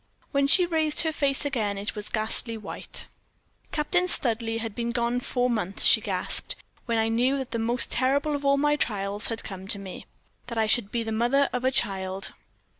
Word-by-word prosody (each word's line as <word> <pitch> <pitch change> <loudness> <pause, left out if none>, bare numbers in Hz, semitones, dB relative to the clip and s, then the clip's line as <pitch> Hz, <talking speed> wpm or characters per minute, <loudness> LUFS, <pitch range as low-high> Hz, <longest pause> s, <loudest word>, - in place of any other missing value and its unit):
When 280 -1 +2
she 360 +5 +6
raised 315 -3 +2
her 320 - 0
face 280 -1 0
again, 220 -8 -1
it 200 +2 -3
was 210 -1 -3
ghastly 225 +1 -1
white. 215 - -5 0.7
"Captain 355 +4 +1
Studleigh 230 -7 0
had 225 -2 -4
been 235 +1 -2
gone 240 0 0
four 245 0 0
months," 215 -5 -1
she - - +8
gasped, - - -2 0.3
"when 230 -1 +1
I 220 0 +2
knew 245 +5 +2
that 265 -3 -5
the 230 - -2
most 235 +2 +2
terrible 280 +5 +2
of 285 - -4
all 280 0 +4
my 295 +1 +3
trials 205 -5 -2
had 225 -1 -3
come 190 -1 -8
to 200 - -1
me 195 -2 -9 0.4
that 235 -1 -5
I 220 - +3
should 215 -1 +1
be 235 -1 -1
the 225 - -4
mother 240 +6 +2
of 250 0 -1
a 260 - +4
child. 190 -6 -2
235 Hz, 200 wpm, -26 LUFS, 215-275 Hz, 0.7 s, she